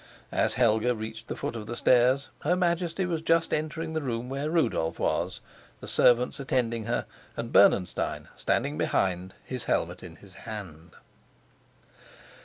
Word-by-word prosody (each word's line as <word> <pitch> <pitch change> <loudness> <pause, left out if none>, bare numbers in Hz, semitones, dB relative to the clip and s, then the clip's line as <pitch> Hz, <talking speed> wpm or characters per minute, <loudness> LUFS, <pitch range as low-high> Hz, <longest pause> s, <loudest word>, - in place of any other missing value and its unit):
As - - +1
Helga 120 0 +3
reached 110 +1 -7
the - - -4
foot - - -4
of 110 -2 -6
the 120 - -5
stairs, 130 +3 +3
her 175 +4 +1
Majesty 175 0 0
was 170 -3 -2
just 165 0 +2
entering 160 +1 -2
the 160 - -1
room 125 -2 -3
where 140 +3 -2
Rudolf 115 - +1
was, - - -1 0.4
the - - -9
servants 125 +3 +3
attending 115 -4 -1
her, 120 +2 -1 0.3
and - - -4
Bernenstein 90 - +3
standing 75 +2 -1
behind, 90 +2 0
his 130 -2 -5
helmet 90 +2 -1
in 85 -3 -10
his 95 +1 -16 0.2
hand. 85 -6 -8
120 Hz, 150 wpm, -28 LUFS, 105-155 Hz, 0.4 s, Helga